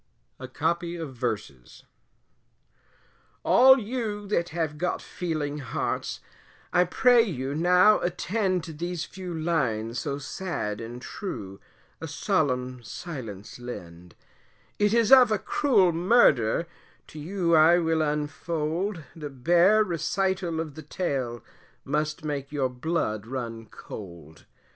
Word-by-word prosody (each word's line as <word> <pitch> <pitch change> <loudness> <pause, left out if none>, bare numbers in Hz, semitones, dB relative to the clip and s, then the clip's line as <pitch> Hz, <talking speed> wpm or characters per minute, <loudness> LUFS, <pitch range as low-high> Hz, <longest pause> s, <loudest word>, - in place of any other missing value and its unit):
A 130 - -7
COPY 170 +5 -1
OF 160 -5 -6
VERSES. 105 - -5 1.6
All 265 +1 +7
you 215 -2 -3
that 175 -4 0
have 160 -2 -3
got 180 +1 -1
feeling 155 -4 -4
hearts, 135 - -3 0.5
I 180 0 +5
pray 245 +6 +5
you 140 - -3
now 180 +6 +5
attend, 185 0 -1
To 160 - -7
these 175 +2 -4
few 185 -2 -8
lines 130 -9 -1
so 140 -2 -3
sad 140 - -4
and 120 +2 -8
true, 100 - -6 0.4
a 160 - -4
solemn 130 - -1
silence 115 - -8
lend, 90 -8 -9 0.6
It 205 0 +3
is 230 0 +3
of 255 -4 +8
a 215 - +3
cruel 200 -5 +3
murder, 165 - +3 0.4
to 155 - -11
you 170 +1 +1
I 160 +2 +6
will 165 -2 +1
unfold 155 +4 -2
The 150 -3 -6
bare 175 - +4
recital 180 0 -1
of 160 -3 -4
the 155 - -9
tale, 135 -7 -3 0.4
must 150 +2 -2
make 140 -2 -3
your 140 -3 0
blood 125 -6 -2
run 115 -3 -5
cold. 85 -6 -11
160 Hz, 125 wpm, -26 LUFS, 130-180 Hz, 1.6 s, of